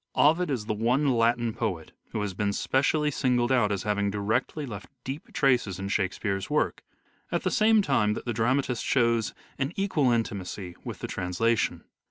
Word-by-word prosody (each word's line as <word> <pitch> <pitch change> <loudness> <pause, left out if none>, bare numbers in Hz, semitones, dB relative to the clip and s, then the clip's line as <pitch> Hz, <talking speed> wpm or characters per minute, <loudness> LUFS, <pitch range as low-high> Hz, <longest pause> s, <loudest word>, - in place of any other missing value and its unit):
Ovid 165 +4 +4
is 125 -7 -2
the 110 - -1
one 125 +6 +2
Latin 120 -1 +2
poet 95 -10 -3 0.2
who 105 - -3
has 105 -2 -2
been 100 +1 -1
specially 150 +6 +1
singled 125 -3 +1
out 120 -6 +3
as 100 -2 -1
having 105 -1 0
directly 110 +9 -1
left 100 -6 -8
deep 135 +4 -6
traces 125 -8 +2
in 95 +1 -4
Shakespeare's 95 0 -1
work, 150 +1 0 0.5
at - - 0
the - - 0
same 220 -1 +4
time 105 - +2
that - - -6
the 120 - -1
dramatist 125 +2 0
shows 115 -3 +1 0.2
an 135 +2 0
equal 180 -9 +1
intimacy 100 -6 -3
with - - -6
the - - -3
trans 90 0 -4
lation. 115 0 +1
115 Hz, 180 wpm, -27 LUFS, 105-135 Hz, 0.5 s, Ovid